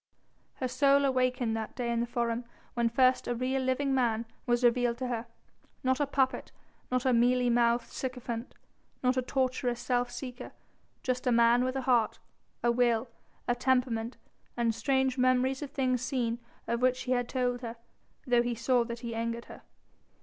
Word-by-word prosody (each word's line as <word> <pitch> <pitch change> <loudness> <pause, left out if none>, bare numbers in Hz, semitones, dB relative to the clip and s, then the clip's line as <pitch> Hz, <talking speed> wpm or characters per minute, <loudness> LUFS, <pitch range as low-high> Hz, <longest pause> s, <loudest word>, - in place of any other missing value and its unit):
Her 255 - -2
soul 275 +2 +3
awakened 255 -3 +1
that 220 -1 -5
day 240 -2 -2
in 235 - 0
the 235 - 0
Forum 235 0 -1 0.3
when 235 -1 +1
first 255 +2 +3
a 245 - 0
real, 260 +2 0
living 260 +2 0
man 235 -3 +1 0.2
was 240 0 +2
revealed 240 0 +3
to 255 0 -3
her; 235 -1 -3 0.6
not 260 +1 +2
a 290 - +1
puppet, 265 -1 0 0.4
not 255 0 0
a 260 - +4
mealy 245 +1 +3
mouthed 235 0 +2
sycophant, 250 -2 -5 0.5
not 250 0 +3
a 255 - +2
tortuous 255 -1 -1
self 245 0 0
seeker, 245 0 -7 0.5
just 255 0 -1
a - - +4
man 235 +1 +5
with 255 +1 -1
a 270 - -1
heart, 245 -3 +2 0.5
a 240 - +4
will, 235 0 +2 0.4
a 240 - +3
temperament 245 -2 0 0.4
and 235 -1 +2
strange 265 +1 +1
memories 255 +1 +2
of 290 - -5
things 255 -3 0
seen 240 -3 -1 0.3
of 235 +1 -1
which 255 0 +2
he 255 - -4
had 245 -1 +1
told 250 -1 -1
her, 230 -2 -5 0.5
though 245 -2 +4
he 240 0 -1
saw 240 +1 +2
that 235 0 -6
he 235 -2 -4
angered 230 +1 -3
her. - - -12
245 Hz, 180 wpm, -30 LUFS, 235-255 Hz, 0.6 s, man